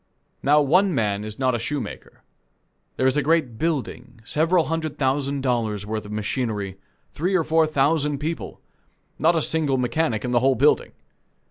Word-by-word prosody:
Now 150 Hz, +2 st, +4 dB
one 180 Hz, +5 st, +3 dB
man 105 Hz, -4 st, 0 dB
is 110 Hz, 0 st, -7 dB
not 130 Hz, -1 st, +1 dB
a 120 Hz, -, -1 dB
shoemaker. 130 Hz, -2 st, -6 dB, 0.7 s
There 130 Hz, -, +1 dB
is 130 Hz, +2 st, +2 dB
a -, -, +3 dB
great 150 Hz, -7 st, +1 dB
building 135 Hz, -6 st, -3 dB
several 165 Hz, +6 st, +2 dB
hundred 160 Hz, -1 st, -3 dB
thousand 140 Hz, 0 st, 0 dB
dollars' 115 Hz, -6 st, -1 dB
worth 110 Hz, 0 st, -4 dB
of -, -, -9 dB
machinery, 105 Hz, -3 st, -3 dB, 0.3 s
three 180 Hz, +5 st, -1 dB
or 175 Hz, -, +3 dB
four 160 Hz, 0 st, +3 dB
thousand 150 Hz, 0 st, +1 dB
people 160 Hz, +4 st, -5 dB, 0.6 s
not 165 Hz, +4 st, +3 dB
a 160 Hz, -, +1 dB
single 150 Hz, -4 st, +1 dB
mechanic 125 Hz, -2 st, 0 dB
in 125 Hz, -, -2 dB
the 120 Hz, -, +3 dB
whole 135 Hz, +1 st, +3 dB
building. 145 Hz, +4 st, +2 dB
135 Hz, 165 wpm, -23 LUFS, 120-160 Hz, 0.7 s, Now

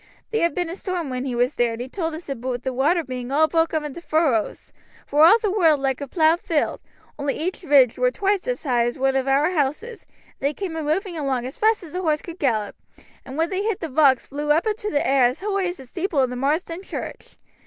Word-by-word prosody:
"Theere'd 340 Hz, -9 st, +1 dB
been 355 Hz, -1 st, -1 dB
a -, -, -5 dB
storm 360 Hz, -7 st, -4 dB
when 255 Hz, +1 st, -3 dB
he 255 Hz, -3 st, -3 dB
was 245 Hz, +3 st, +1 dB
there, 240 Hz, -1 st, +1 dB
and 225 Hz, -, -7 dB
he -, -, -8 dB
told 325 Hz, +2 st, -3 dB
us 330 Hz, -, -10 dB
aboot 250 Hz, -2 st, -4 dB
the 260 Hz, -, -2 dB
water 310 Hz, +7 st, +2 dB
being 255 Hz, -2 st, -6 dB
all 310 Hz, +3 st, +4 dB
broke 325 Hz, 0 st, +1 dB
up 315 Hz, -1 st, -1 dB
into 300 Hz, +3 st, -7 dB
furrowes, 310 Hz, -10 st, 0 dB, 0.3 s
vor 295 Hz, +2 st, +4 dB
all 435 Hz, -, +7 dB
the 430 Hz, -3 st, -1 dB
world 330 Hz, -7 st, +3 dB
like 270 Hz, 0 st, -1 dB
a 280 Hz, -, -4 dB
plowed 320 Hz, +3 st, +3 dB
field, 320 Hz, -4 st, -1 dB, 0.4 s
only 280 Hz, -1 st, -1 dB
each 355 Hz, +4 st, -3 dB
ridge 275 Hz, -8 st, +4 dB
wur -, -, +4 dB
twice 405 Hz, -2 st, -1 dB
as -, -, -2 dB
high 240 Hz, -5 st, +2 dB
as 240 Hz, -, -4 dB
one 270 Hz, 0 st, +1 dB
of 265 Hz, 0 st, 0 dB
our 285 Hz, +5 st, +3 dB
houses, 360 Hz, -, -2 dB
and -, -, -30 dB
they 280 Hz, +2 st, 0 dB
came 375 Hz, -5 st, -4 dB
a 320 Hz, -, -3 dB
moving 335 Hz, +3 st, -2 dB
along 265 Hz, -4 st, -1 dB
as 260 Hz, -, -6 dB
fast 435 Hz, -1 st, +2 dB
as 320 Hz, -, -11 dB
a 365 Hz, -, -2 dB
horse 310 Hz, -4 st, 0 dB
could 340 Hz, 0 st, -9 dB
gallop, 220 Hz, -7 st, 0 dB, 0.5 s
and 265 Hz, +2 st, -8 dB
when 330 Hz, +3 st, 0 dB
they 380 Hz, +1 st, -1 dB
hit 430 Hz, -2 st, -1 dB
the 325 Hz, -, -5 dB
rocks 270 Hz, -3 st, +4 dB
vlew 295 Hz, +1 st, -2 dB
up 320 Hz, +6 st, +3 dB
into 425 Hz, -1 st, -2 dB
t' -, -, -6 dB
air 270 Hz, -2 st, +3 dB
as 250 Hz, +6 st, 0 dB
hoigh 395 Hz, -2 st, 0 dB
as 355 Hz, -, -4 dB
the 265 Hz, -, -11 dB
steeple 340 Hz, +5 st, -4 dB
o' 265 Hz, -, +5 dB
Marsden 300 Hz, +7 st, -1 dB
church. -, -, -8 dB
305 Hz, 250 wpm, -23 LUFS, 265-355 Hz, 0.5 s, all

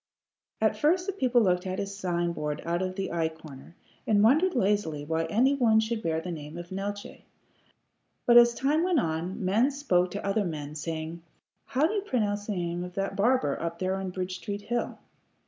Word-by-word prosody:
At -, -, +2 dB
first 350 Hz, +4 st, +2 dB
the 395 Hz, -, -2 dB
people 255 Hz, -, +3 dB
looked 180 Hz, -1 st, +1 dB
at 185 Hz, 0 st, -3 dB
his 200 Hz, 0 st, -4 dB
sign 175 Hz, -3 st, -1 dB
board 150 Hz, -2 st, -4 dB
out 170 Hz, +1 st, 0 dB
of 185 Hz, 0 st, -2 dB
the 195 Hz, 0 st, -3 dB
eye 165 Hz, -1 st, 0 dB
corner, 160 Hz, -1 st, -13 dB, 0.3 s
and 205 Hz, -1 st, +4 dB
wondered 310 Hz, +11 st, +4 dB
lazily 190 Hz, -, 0 dB
why 160 Hz, +1 st, 0 dB
any 240 Hz, +11 st, +3 dB
one 230 Hz, -5 st, +4 dB
should 220 Hz, 0 st, -1 dB
bear 160 Hz, -5 st, 0 dB
the 180 Hz, +2 st, -5 dB
name 155 Hz, 0 st, -7 dB
of 175 Hz, +1 st, -8 dB
Neeltje; 205 Hz, +2 st, -5 dB, 1.0 s
but 240 Hz, -, +5 dB
as 240 Hz, 0 st, +8 dB
time 285 Hz, +6 st, +1 dB
went 355 Hz, -3 st, +2 dB
on, 170 Hz, +1 st, -2 dB
men 220 Hz, +8 st, +3 dB
spoke 190 Hz, -11 st, +1 dB
to 200 Hz, +3 st, -5 dB
other 200 Hz, +2 st, +1 dB
men, 150 Hz, -5 st, -5 dB
saying, 160 Hz, +2 st, -5 dB, 0.4 s
"How 275 Hz, +2 st, +1 dB
do 355 Hz, -, 0 dB
you 415 Hz, -, 0 dB
pronounce 210 Hz, -, -1 dB
the 210 Hz, -, -1 dB
name 175 Hz, -1 st, -2 dB
of 180 Hz, 0 st, -8 dB
that 195 Hz, 0 st, -2 dB
barber 205 Hz, -, +2 dB
up 170 Hz, 0 st, -3 dB
there 185 Hz, +1 st, -1 dB
on 190 Hz, -1 st, -3 dB
Bridge 185 Hz, 0 st, -4 dB
Street 205 Hz, +1 st, -5 dB
hill?" 240 Hz, +2 st, -2 dB
195 Hz, 200 wpm, -28 LUFS, 170-235 Hz, 1.0 s, as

